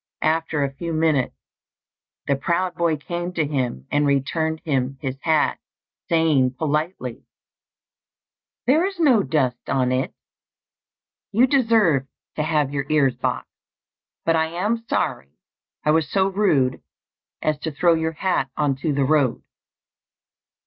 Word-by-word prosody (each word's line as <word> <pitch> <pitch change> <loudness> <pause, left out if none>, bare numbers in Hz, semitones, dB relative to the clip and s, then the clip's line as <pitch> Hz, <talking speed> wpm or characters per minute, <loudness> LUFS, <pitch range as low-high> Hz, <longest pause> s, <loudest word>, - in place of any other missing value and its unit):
After 160 -2 +1
a 135 -1 -2
few 165 +4 -5
minutes, 155 -5 +1 0.9
the 140 - +2
proud 170 +6 -1
boy 170 -3 +1
came 175 +4 -4
to 160 -3 0
him 125 - -2
and 145 0 +2
returned 160 +3 0
him 135 -3 -1
his 130 -1 -3
hat, 160 -2 +2 0.5
saying 150 -6 +3
politely 150 -4 -2 1.4
"There 290 +7 +4
is 390 -3 -7
no 265 -10 +5
dust 130 -9 -1
on 130 -1 +1
it; 130 +1 0 1.2
you 235 +5 +5
deserved 225 - +3 0.3
to - - -1
have 150 -3 0
your 140 -1 -2
ears 145 -4 +3
boxed, - - -3 0.7
but 165 - +3
I 160 0 +2
am 205 +8 -2
sorry 70 +1 -2 0.5
I 150 - +4
was 155 -2 +2
so 195 -1 +2
rude 155 -11 +1 0.6
as 155 -1 0
to 160 +1 -3
throw 170 +4 +3
your 160 0 -1
hat 160 -5 0
on 145 -2 +2
to 150 +2 -1
the 140 -1 +1
road." 140 -4 +2
155 Hz, 135 wpm, -22 LUFS, 135-170 Hz, 1.4 s, no